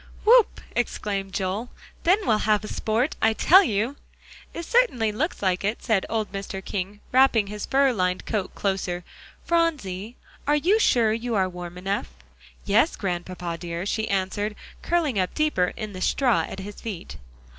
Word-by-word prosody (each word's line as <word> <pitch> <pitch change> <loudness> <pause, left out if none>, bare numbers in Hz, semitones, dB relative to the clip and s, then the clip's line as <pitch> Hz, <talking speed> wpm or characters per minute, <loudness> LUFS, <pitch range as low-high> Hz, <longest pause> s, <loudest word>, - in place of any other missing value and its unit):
"Whoop!" 470 0 +5
exclaimed 200 -4 -2
Joel, 195 +5 -2 0.4
"then 365 +4 +6
we - - -7
will 215 -1 +4
have 215 0 +1
sport, 230 +7 0
I 220 0 +4
tell 365 - +7
you!" 230 - -1 0.5
"It 335 - -6
certainly 320 - +2
looks 275 - -2
like 185 -1 +1
it," 210 +3 -2
said 220 -5 +1
old 220 -2 -1
Mr. 195 -1 -6
King, 200 +1 -4
wrapping 255 -4 +5
his 210 +1 -6
fur 270 -1 +3
lined 180 -3 -1
coat 205 -4 -3
closer. 190 -3 -2 0.4
"Phronsie, 250 - 0 0.3
are 295 - +4
you 365 +9 +3
sure 230 - +3
you 230 +1 -2
are 190 -2 +2
warm 175 -1 -8
enough?" 195 +3 -2 0.6
"Yes, 225 +11 +3
Grandpapa 175 -2 -4
dear," 170 +1 -4
she 220 +2 -1
answered, 200 +2 -1 0.3
curling 315 - +1
up 185 -1 -1
deeper 300 -13 +1
in 215 -1 -5
the 185 - -7
straw 230 - +2
at - - -7
his 205 +1 -9
feet. 200 -7 -6
210 Hz, 165 wpm, -25 LUFS, 190-255 Hz, 0.6 s, tell